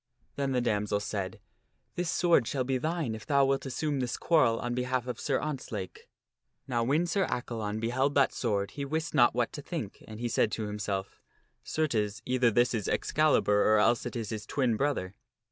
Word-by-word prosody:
Then 140 -1 -1
the 125 -1 +1
damoiselle 105 -3 0
said, 100 -3 -4 0.3
" - - -46
This 175 -1 -1
sword 170 -10 +3
shall 135 -2 0
be 130 0 0
thine 160 -4 -1
if 110 0 -7
thou 140 -2 +4
wilt 135 0 0
assume 145 +1 -1
this 125 -2 -2
quarrel 150 -9 +3
upon 120 +1 -3
behalf 125 0 -1
of 125 - -5
Sir 135 -2 0
Ontzlake." 120 -11 -5 0.6
Now 120 -3 0
when 145 +8 +2
Sir 190 +2 +1
Accalon 110 -3 -3
beheld 130 +5 0
that 140 -2 +4
sword 100 -5 -1
he 140 - -5
wist 160 +4 -2
not - - +5
what - - 0
to - - -6
think, - - -6
and 110 0 -9
he 120 - -1
said 110 -2 +1
to 110 - -2
himself, 100 -2 -4 0.2
" - - -45
Certes, 115 -8 0
either 125 -1 +3
this 120 +2 +2
is 110 -5 -2
Excalibur 140 -9 +2
or 110 - +6
else 120 +3 +3
it 120 - -7
is 115 -3 -3
his 110 -2 -5
twin 125 -5 +1
brother." 120 -8 -1
125 Hz, 200 wpm, -29 LUFS, 110-140 Hz, 0.6 s, or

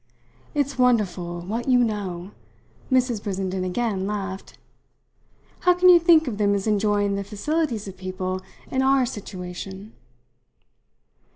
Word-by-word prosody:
"It's 280 -2 -1
wonderful 190 -8 +1
what 220 +8 -4
you 250 -2 +5
know!" 195 -4 -3 0.6
Mrs. 250 -4 +2
Brissenden 190 -2 -2
again 195 0 -1
laughed. 195 -2 -5 1.0
"How 360 0 +4
can 365 +1 +5
you 350 -1 +9
think 330 -2 +5
of 215 -4 -3
them 200 -1 +3
as 195 - -2
enjoying 205 -1 +1
the 200 0 -2
facilities 230 +2 -2
of 190 -1 -9
people 185 0 -4 0.3
in 260 - +1
our 265 -1 +4
situation?" 190 -1 -7
205 Hz, 125 wpm, -24 LUFS, 190-250 Hz, 1.0 s, you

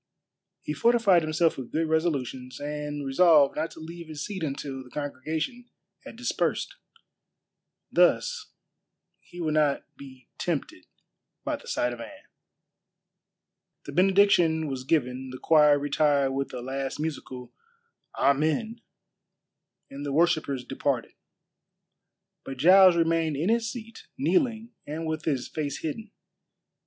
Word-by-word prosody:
He 150 - -3
fortified 225 -1 +4
himself 155 +1 +1
with 125 - -8
good 160 +1 0
resolutions, 140 -6 -2
and 150 0 -4
resolved 145 0 +5
not 160 +2 -2
to - - -13
leave 165 +1 -9
his 155 -1 -6
seat 195 -3 -6
until 140 -3 -4
the 125 - -16
congregation 155 - -4 0.3
had - - -11
dispersed. - - -2 1.2
Thus 485 -3 +2 0.7
he 175 - -14
would 155 -3 -1
not 150 -2 +2
be 130 -3 -13
tempted 145 - -3 0.6
by - - -2
the - - -16
sight 120 0 0
of 120 - -8
Anne. - - -11 1.6
The - - -7
benediction 180 -2 +4
was 130 -2 -5
given, 130 -3 0
the 130 - -7
choir 150 0 +5
retired 145 -1 +2
with 135 +1 -3
a 125 - -6
last 135 +1 -4
musical 130 -5 -5 0.6
"Amen," 160 - +1 1.1
and 140 +1 -7
the 145 - -3
worshippers 155 -5 +1
departed. - - -2 1.3
But 135 - -7
Giles 185 +5 +7
remained 165 -3 +1
in 165 +7 0
his 230 0 +1
seat, 230 -2 -10
kneeling 245 -5 0 0.2
and 155 +3 -4
with 160 +1 -3
his 135 -6 -1
face 145 -3 -4
hidden. 205 +8 -5
155 Hz, 125 wpm, -27 LUFS, 140-175 Hz, 1.6 s, Giles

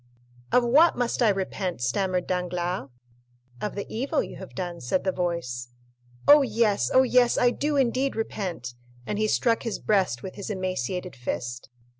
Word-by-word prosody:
"Of 250 - +4
what 295 +8 +5
must 245 +1 -1
I 230 - +5
repent?" 190 -3 -2
stammered 180 +9 0
Danglars. 180 -4 -2 0.7
"Of 210 - -3
the 200 - -4
evil 275 +7 -1
you - - -9
have 190 - -10
done," 175 -2 -4
said 125 +10 0
the 190 - +1
voice. 170 -10 -3 0.6
"Oh, 295 0 +9
yes; 215 - +1
oh, 260 - +6
yes, 250 -1 +3
I 245 - +4
do 295 +3 -1
indeed 265 0 +1
repent." 180 - -4 0.3
And 210 - -3
he 215 - +2
struck 230 +1 +2
his 230 -3 -3
breast 190 - +1
with 185 - -6
his 200 - -7
emaciated 185 - -3
fist. 120 0 -5
190 Hz, 165 wpm, -26 LUFS, 175-235 Hz, 0.7 s, Oh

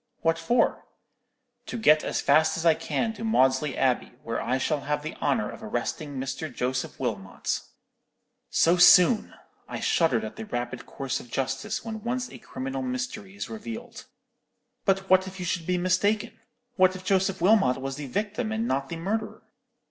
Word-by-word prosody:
"'What 165 0 +2
for?' 240 +4 +1 0.8
"'To - - -4
get 155 -9 +5
as - - -1
fast 155 +4 +4
as 165 - -3
I 165 - +7
can 225 +7 -2
to 225 - -8
Maudesley 135 - +2
Abbey, 130 -2 +1
where 115 0 -2
I 125 - 0
shall 145 +3 0
have 150 +1 -2
the 155 - -4
honour - - +1
of - - -11
arresting 145 -2 -3
Mr. 135 +3 -4
Joseph 125 +1 -3
Wilmot.' 100 -7 -2 0.9
"So 170 +2 +4
soon! 180 +5 +6 0.3
I - - -4
shuddered 130 -10 +2
at 110 - -7
the 220 - -5
rapid 120 - -4
course 135 -2 -3
of 120 - -12
justice 135 - -2
when 220 -1 -5
once 250 +1 -2
a - - -10
criminal 265 +2 -5
mystery 245 -6 -4
is 205 - -5
revealed. 230 +2 -8 0.8
"'But 195 -1 +1
what 190 0 +4
if 190 0 -8
you 180 - -4
should 175 -1 -2
be 180 0 +1
mistaken! 190 +4 +1 0.5
What 185 0 +5
if 185 0 -9
Joseph 190 -1 +1
Wilmot 180 - +4
was 135 +1 -4
the 145 -2 -5
victim 215 - -2
and 225 +1 -1
not 135 0 -1
the - - -4
murderer?" 215 +5 -3
180 Hz, 175 wpm, -27 LUFS, 135-220 Hz, 0.9 s, I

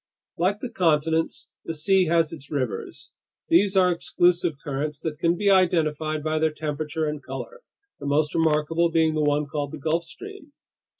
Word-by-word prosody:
Like 190 +5 0
the 250 - -5
continents, 160 -1 +1 0.2
the 165 - -4
sea 190 +4 +3
has 165 -1 +2
its 145 -3 -9
rivers. 125 -10 -4 0.4
These 195 +3 +4
are 180 -1 +5
exclusive 175 0 +1
currents 145 +1 -3
that 155 -2 -4
can 170 +1 +2
be 200 +1 +3
identified 155 -5 +2
by 155 0 0
their 160 0 +3
temperature 155 +1 -3
and 150 -1 -3
color, - - -8 0.4
the - - -6
most 150 +1 +1
remarkable 165 +1 +2
being 160 -1 +2
the 155 - 0
one 150 0 +1
called 145 0 -4
the - - -5
Gulf 160 +4 -1
Stream. 345 - -11
160 Hz, 170 wpm, -24 LUFS, 150-175 Hz, 0.4 s, are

